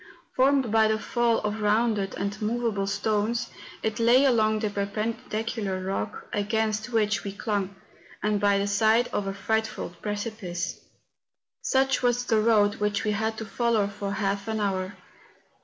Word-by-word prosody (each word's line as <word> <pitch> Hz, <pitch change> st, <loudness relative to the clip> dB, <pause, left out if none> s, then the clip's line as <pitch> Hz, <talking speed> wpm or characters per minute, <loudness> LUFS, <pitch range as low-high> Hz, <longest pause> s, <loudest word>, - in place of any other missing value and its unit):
Formed 265 Hz, -3 st, +3 dB
by 220 Hz, 0 st, +5 dB
the 215 Hz, 0 st, +1 dB
fall 235 Hz, +1 st, +1 dB
of 210 Hz, +1 st, -2 dB
rounded 210 Hz, -1 st, +1 dB
and 200 Hz, +3 st, -3 dB
moveable 215 Hz, -2 st, 0 dB
stones, 210 Hz, +3 st, 0 dB, 0.3 s
it 220 Hz, +1 st, -1 dB
lay 240 Hz, +4 st, +5 dB
along 220 Hz, -4 st, +3 dB
the 215 Hz, -1 st, -1 dB
perpendicular 215 Hz, 0 st, -2 dB
rock, 190 Hz, +1 st, -3 dB
against 215 Hz, +1 st, 0 dB
which 220 Hz, -2 st, +1 dB
we 200 Hz, -, -4 dB
clung, 200 Hz, -1 st, -2 dB, 0.5 s
and 210 Hz, -1 st, +1 dB
by 200 Hz, -1 st, +4 dB
the 200 Hz, -, 0 dB
side 220 Hz, +4 st, +3 dB
of 200 Hz, -, -2 dB
a 195 Hz, -, -2 dB
frightful 220 Hz, +2 st, -1 dB
precipice. 205 Hz, -4 st, -4 dB, 0.8 s
Such 265 Hz, 0 st, +2 dB
was 245 Hz, -1 st, +1 dB
the 220 Hz, -2 st, +3 dB
road 215 Hz, -2 st, +3 dB
which 210 Hz, -1 st, 0 dB
we 215 Hz, -, +1 dB
had 220 Hz, +1 st, -1 dB
to 220 Hz, -, -5 dB
follow 225 Hz, 0 st, +1 dB
for 200 Hz, 0 st, -4 dB
half 200 Hz, 0 st, -1 dB
an 220 Hz, 0 st, -1 dB
hour. 190 Hz, -1 st, -1 dB
215 Hz, 155 wpm, -26 LUFS, 200-225 Hz, 0.8 s, by